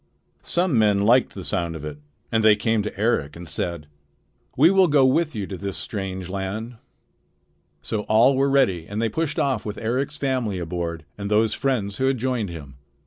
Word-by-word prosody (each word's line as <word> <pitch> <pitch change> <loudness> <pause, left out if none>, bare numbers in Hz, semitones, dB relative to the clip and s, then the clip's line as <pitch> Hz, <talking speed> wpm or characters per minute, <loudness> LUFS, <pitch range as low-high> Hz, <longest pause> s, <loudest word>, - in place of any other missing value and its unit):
Some 175 -8 +1
men 105 -2 +4
liked 120 +4 +3
the 95 - -6
sound 85 -4 -2
of 75 -2 -7
it, 75 -1 -7 0.3
and 110 -1 +2
they 110 -1 +7
came 110 +1 +1
to 105 -1 -6
Eric 105 -10 0
and 85 0 -9
said: 85 -1 -3 0.7
"We 155 +7 +6
will 190 -1 +5
go 145 -3 +4
with 155 +3 +2
you 105 -2 -3
to 95 0 -6
this 100 -1 -4
strange 95 -3 -4
land." 100 +5 -5 1.1
So 110 - -2
all 115 +5 +5
were 135 +1 +2
ready 110 -12 +2
and 105 +1 -4
they 115 0 +1
pushed 155 +6 -2
off 130 -5 0
with 105 -1 -5
Eric's 130 +6 -2
family 130 -8 -1
aboard 85 -2 -4
and 100 0 -4
those 110 0 +3
friends 110 -8 -1
who 130 - +1
had 135 -1 +1
joined 120 -4 -1
him. 70 -5 -9
110 Hz, 195 wpm, -23 LUFS, 95-130 Hz, 1.1 s, they